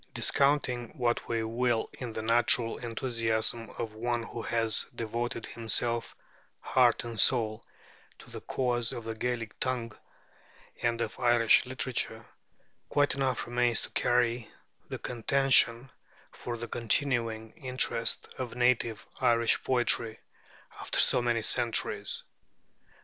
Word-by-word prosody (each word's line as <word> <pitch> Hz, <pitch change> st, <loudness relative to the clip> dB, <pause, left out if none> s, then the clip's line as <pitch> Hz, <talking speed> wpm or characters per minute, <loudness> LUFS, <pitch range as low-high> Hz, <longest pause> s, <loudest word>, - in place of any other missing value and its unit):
Discounting 140 Hz, -2 st, +1 dB
what 120 Hz, -2 st, 0 dB
we 115 Hz, -1 st, 0 dB
will 115 Hz, 0 st, 0 dB
in 120 Hz, -3 st, -7 dB
the 110 Hz, -, -4 dB
natural 115 Hz, 0 st, +2 dB
enthusiasm 115 Hz, -1 st, -1 dB
of 110 Hz, -2 st, -4 dB
one 120 Hz, +2 st, -2 dB
who 115 Hz, -, -7 dB
has 115 Hz, -1 st, +1 dB
devoted 115 Hz, 0 st, -3 dB
himself 115 Hz, 0 st, -2 dB, 0.4 s
heart 125 Hz, -3 st, +3 dB
and 115 Hz, -2 st, -5 dB
soul 110 Hz, -1 st, +3 dB, 0.5 s
to -, -, -15 dB
the -, -, -7 dB
cause 120 Hz, -3 st, -1 dB
of 120 Hz, -, -6 dB
the 115 Hz, 0 st, -4 dB
Gaelic 115 Hz, -1 st, -4 dB
tongue 125 Hz, -3 st, -2 dB, 0.9 s
and 120 Hz, 0 st, 0 dB
of 115 Hz, 0 st, -4 dB
Irish 120 Hz, 0 st, +4 dB
literature, 125 Hz, -3 st, -2 dB, 0.6 s
quite 145 Hz, -1 st, +2 dB
enough 130 Hz, -3 st, -1 dB
remains 120 Hz, -1 st, +1 dB
to -, -, -9 dB
carry 120 Hz, -1 st, +1 dB, 0.4 s
the -, -, -4 dB
contention 130 Hz, 0 st, +3 dB, 0.4 s
for 120 Hz, -1 st, -6 dB
the 120 Hz, +1 st, -5 dB
continuing 115 Hz, -2 st, -1 dB
interest 125 Hz, -4 st, -1 dB
of 125 Hz, -3 st, -4 dB
native 120 Hz, -3 st, +1 dB
Irish 115 Hz, -1 st, +2 dB
poetry 120 Hz, -3 st, +2 dB, 0.6 s
after -, -, -2 dB
so -, -, +4 dB
many 120 Hz, -2 st, 0 dB
centuries. 120 Hz, 0 st, 0 dB
120 Hz, 120 wpm, -29 LUFS, 115-125 Hz, 0.9 s, Irish